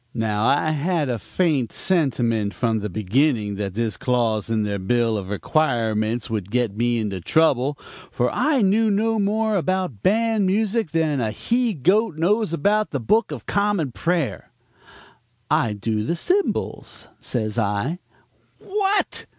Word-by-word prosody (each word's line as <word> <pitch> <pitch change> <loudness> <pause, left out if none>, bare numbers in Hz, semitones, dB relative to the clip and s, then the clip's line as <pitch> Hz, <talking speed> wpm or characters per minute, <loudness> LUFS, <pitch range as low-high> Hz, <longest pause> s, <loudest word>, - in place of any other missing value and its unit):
"Now, 110 -1 0
I 150 +2 +2
had 155 -1 0
a 120 -2 -2
faint 145 - 0
sentiment 120 - 0
from 115 -2 0
the 105 0 -4
beginning 110 - +1
that 100 -2 -4
this 115 -1 -1
clause 115 -4 0
in 110 -1 +1
their 100 -1 -2
bill 115 +3 +1
of 95 -3 -4
requirements 115 -2 0
would 105 -4 -4
get 120 -3 0
me 120 +1 +1
into 100 -5 -3
trouble, 140 - +2 0.3
for 125 0 0
I 275 -2 +2
knew 215 +3 +3
no 220 +2 +1
more 215 +2 +1
about 185 - -2
band 220 - +2
music 215 0 0
than 155 -4 0
a 110 - 0
he 235 - 0
goat 185 - +2
knows 205 +4 +1
about 205 +7 +1
the 140 - -3
book 215 - +1
of - - -7
common 200 -9 0
prayer. 160 - -2 1.0
"'I 110 - +2
do 105 +1 -2
the 170 - -1
cymbals,' 370 - -2
says 110 -2 -2
I. 110 - -1 0.6
"'What!' 405 0 -1
135 Hz, 150 wpm, -22 LUFS, -, 1.0 s, knew